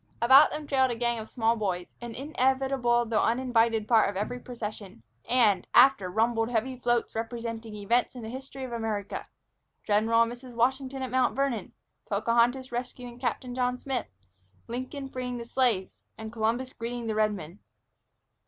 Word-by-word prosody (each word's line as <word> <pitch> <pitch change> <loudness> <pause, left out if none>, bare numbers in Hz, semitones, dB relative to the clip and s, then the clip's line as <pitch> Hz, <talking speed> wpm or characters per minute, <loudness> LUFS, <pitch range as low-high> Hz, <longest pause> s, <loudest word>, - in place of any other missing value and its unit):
About 265 +5 +7
them 300 0 -5
trailed 265 -2 +2
a 240 - -2
gang 235 0 0
of 220 - -8
small 230 -1 +1
boys, 185 -5 -2 0.2
an 235 -1 -7
inevitable 265 -3 +1
though 220 -1 +1
uninvited 230 -3 +2
part 225 -3 +4
of 200 - -6
every 215 +5 -3
procession, 215 - -7 0.3
and, 220 -7 +3
after, 245 -6 +6
rumbled 225 +3 +1
heavy 245 +2 -1
floats 240 -1 0
representing 230 -1 -5
events 235 +5 0
in 245 - -7
the 220 - -6
history 265 +2 -7
of 255 - -6
America, 220 -3 -3 0.6
General 220 +2 +4
and 230 - -3
Mrs. 245 0 -10
Washington 265 +2 0
at 255 - -4
Mount 255 -1 +2
Vernon, 265 -7 -1 0.4
Pocahontas 235 +5 +2
rescuing 245 0 -6
Captain 250 0 -2
John 250 0 0
Smith, 265 -1 -3 0.6
Lincoln 255 +4 -5
freeing 250 -2 -4
the 235 - -6
Slaves, 235 -6 0 0.2
and 220 0 -7
Columbus 235 +3 -1
greeting 235 +1 -5
the 220 - -1
Redmen. 210 -5 -1
240 Hz, 160 wpm, -28 LUFS, 225-255 Hz, 0.6 s, About